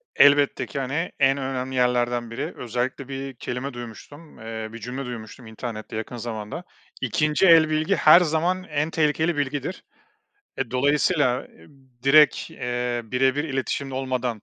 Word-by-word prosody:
Elbette 145 -2 +5
ki, 130 - -5
hani, 145 +6 -2
en 135 0 +4
önemli 130 -1 -3
yerlerden 120 -1 +1
biri. 140 +8 -4
Özellikle 125 +2 -3
bir 135 0 -5
kelime 125 +3 -5
duymuştum, 120 +6 -11
eee, 110 0 -6
bir 115 - -8
cümle 125 +3 -5
duymuştum 120 0 -8
internette 110 -1 -7
yakın 115 +2 -5
zamanda, 110 +7 -5 0.4
2'nci 150 +3 +1
el 165 -2 +7
bilgi 155 0 +1
her 155 +3 +8
zaman 175 +3 0
en 150 -3 -2
tehlikeli 160 +1 +1
bilgidir. 145 +5 -3 0.8
Eee, 135 -4 -2
dolayısıyla, 140 0 +2 0.6
direkt, 140 0 +5
eee, 120 0 -2
birebir 130 +5 +1
iletişimde 135 -1 -3
olmadan 130 -4 -2
135 Hz, 135 wpm, -24 LUFS, 120-150 Hz, 0.8 s, her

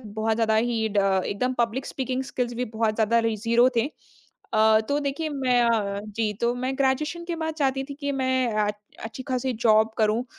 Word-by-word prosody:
बहुत 220 0 0
ज़्यादा 220 -1 +2
ही 225 0 +1
ड 205 -1 +1 0.3
एकदम 250 +6 -1
पब्लिक 240 +2 -1
स्पीकिंग 260 -1 -3
स्किल्स 250 -2 -3
भी 245 +1 -2
बहुत 220 -1 -1
ज़्यादा 225 +1 +3
री 230 -1 0
0 235 +3 +3
थे। 230 - +2 0.7
अ, 220 0 +5
तो 285 0 +1
देखिए, 285 +3 -2
मैं 260 -4 +1
अ, 210 -4 +1
जी, 215 0 -2
तो 235 +1 +1
मैं 255 +2 -2
ग्रेजुएशन 300 +5 0
के 340 -1 -4
बाद 320 -1 -3
चाहती 270 -3 0
थी 280 +1 -8
कि 285 0 -3
मैं 260 -3 0
आ 210 - +2 0.4
अच्छी-खासी 255 +3 -3
जॉब 220 0 +5
करूँ, 220 +2 +2
240 Hz, 190 wpm, -25 LUFS, 220-265 Hz, 0.7 s, अ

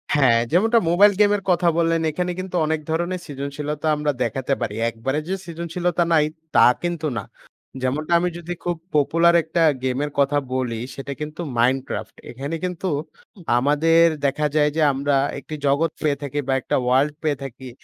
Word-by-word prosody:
হ্যাঁ, 130 -5 +5
যেমনটা 225 +7 +4
মোবাইল 200 +5 +6
গেমের 205 -1 +4
কথা 175 -1 +3
বললেন, 165 -1 +2
এখানে 180 +3 -2
কিন্তু 185 -1 -5
অনেক 160 0 0
ধরণের 175 +3 -2
সৃজনশীলতা 145 +1 -4
আমরা 150 0 0
দেখাতে 130 +4 -1
পারি। 105 - -2
একবারে 135 +6 -2
যে 190 - -1
সৃজনশীলতা 170 +1 -2
নাই, 150 -2 +4 0.3
তা - - +7 0.2
কিন্তু 170 -2 -2
না। 100 - -3 0.6
যেমনটা 150 +6 -1
আমি 180 - 0
যদি 175 +1 -5
খুব 175 0 -1 0.2
পপুলার 165 +4 +4
একটা 165 +1 -1 0.2
গেমের 130 +3 -1
কথা 140 +1 +3 0.2
বলি 125 -3 -2 0.2
সেটা 140 +1 -6
কিন্তু 150 +3 -5 0.2
'Minecraft' 120 -3 -1
এখানে 140 +6 -5
কিন্তু 180 0 -3 0.7
আমাদের 150 +5 +4 0.2
দেখা 145 +2 +1
যায় 150 -1 +4
যে 160 - +1
আমরা 140 +1 0 0.2
একটি 155 - -8
জগৎ 145 +4 +2
পেয়ে 150 -2 +1
থাকি 145 +1 -3
বা 135 - +1
একটা - - -1
ওয়ার্লড 130 +4 +2
পেয়ে 150 -3 0
থাকি 130 -1 -8
150 Hz, 165 wpm, -22 LUFS, 135-170 Hz, 0.7 s, তা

